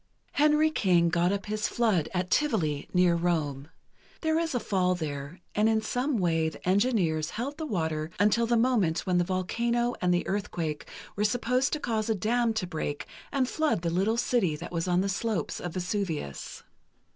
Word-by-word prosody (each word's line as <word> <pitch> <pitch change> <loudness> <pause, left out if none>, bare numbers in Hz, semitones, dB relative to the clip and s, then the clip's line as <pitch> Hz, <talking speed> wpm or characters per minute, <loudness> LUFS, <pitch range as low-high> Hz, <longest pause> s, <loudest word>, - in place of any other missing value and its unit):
Henry 300 +1 +3
King 175 - +3
got 170 +2 +2
up 200 0 -2
his 215 +1 -1
flood 215 -10 +1
at 180 -1 -2
Tivoli, 175 - +1
near 180 -1 +4
Rome. 160 -5 -1 0.5
There 320 0 +2
is 330 -5 -1
a - - +2
fall 185 -4 +1
there, 150 +1 -5
and 215 +1 +3
in 220 0 +3
some 250 +3 0
way 165 -4 +1
the 160 - -11
engineers 185 -7 +2
held 275 +7 -4
the 315 - -3
water 160 - -1
until 215 +3 +3
the 235 0 +3
moment 225 -9 +2
when 180 -1 +2
the - - +3
volcano 235 +7 0
and 180 - +2
the 175 0 +1
earthquake 170 -6 -3 0.3
were 205 - 0
supposed 250 +5 +1
to 300 - 0
cause 225 -4 -1
a 220 - +2
dam 230 +3 +1
to 220 - -1
break 155 -4 -4 0.3
and 270 -3 +1
flood 305 - 0
the 170 - 0
little 195 +6 +1
city 225 -10 +1
that 165 +3 -8
was 170 0 -2
on 180 0 +3
the 195 - 0
slopes 205 +1 -2
of 175 -1 -6
Vesuvius. 180 - -3
190 Hz, 185 wpm, -28 LUFS, 170-235 Hz, 0.5 s, near